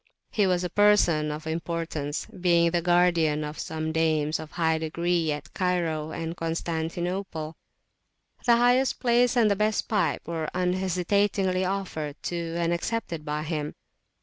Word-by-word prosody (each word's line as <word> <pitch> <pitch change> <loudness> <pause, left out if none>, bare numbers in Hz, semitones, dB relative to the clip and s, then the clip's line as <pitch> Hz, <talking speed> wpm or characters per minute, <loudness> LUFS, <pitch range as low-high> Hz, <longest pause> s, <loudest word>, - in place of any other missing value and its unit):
He 205 -3 +2
was 180 -1 +1
a 180 - -2
person 185 -7 +4
of 150 +1 -6
importance, 160 -2 -3
being 170 -2 +2
the 175 0 +1
guardian 170 -3 +3
of 150 +1 -6
some 160 0 -3
dames 160 -1 +1
of 155 -1 -9
high 160 -1 +1
degree 170 0 0
at 150 - -6
Cairo 170 -4 -1
and 165 +1 -4
Constantinople: 165 0 -3 0.9
the 235 -1 +6
highest 245 +2 +3
place 245 0 +3
and 235 - +5
[p.256] - - +4
the 200 - +2
best 215 +1 +1
pipe 185 - 0
were 160 -2 -2
unhesitatingly 185 +1 +1
offered 180 -6 -3
to 170 -1 -3
and 170 0 +1
accepted 170 -3 -3
by 150 0 -3
him. 150 -2 -3
170 Hz, 150 wpm, -26 LUFS, 160-185 Hz, 0.9 s, the